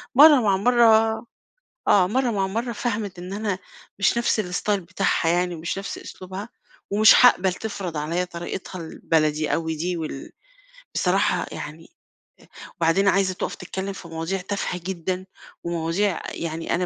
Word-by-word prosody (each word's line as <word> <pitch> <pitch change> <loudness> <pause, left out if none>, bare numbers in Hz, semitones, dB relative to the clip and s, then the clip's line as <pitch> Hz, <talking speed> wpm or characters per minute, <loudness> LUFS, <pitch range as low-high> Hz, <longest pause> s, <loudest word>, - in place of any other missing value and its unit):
مرّة 290 -2 +8
مع 200 -3 +2
مرّة 225 0 +4 0.6
آه. 185 -3 +5
مرّة 250 +4 +1
مع 195 -3 0
مرّة 230 +5 -2
فَهَمِت 210 -6 -3
إن 180 +2 -7
أنا 205 -2 -2 0.4
مش 200 +4 +2
نفس 235 -2 +1
الستايل 195 +2 -1
بتاعها 185 -1 0
يعني 175 0 +1
مش 170 +4 -4
نفس 195 - -5
أسلوبها 190 +4 -8 0.4
ومش 215 +2 +7
حاقبل 190 -7 +5
تفرض 190 -5 -5
عليّا 165 +4 -1
طريقتها 180 +1 -6
البلدي 155 -2 0
أوي 160 -1 -2
دي 175 +3 -2
وال 155 -4 -6 0.6
بصراحة - - +1
يعني - - -7 0.8
أ - - -9
وبعدين 170 +4 +2
عايزة 195 -1 +3
تُقَف 185 - -4
تتكلّم 190 +2 -5
في 185 - -10
مواضيع 165 +4 -3
تافهة 185 -2 -3
جدًا 185 0 -3 0.4
ومواضيع 170 +3 -1
يعني 165 0 -3
أنا 180 +1 0
185 Hz, 145 wpm, -24 LUFS, 170-205 Hz, 0.8 s, مرّة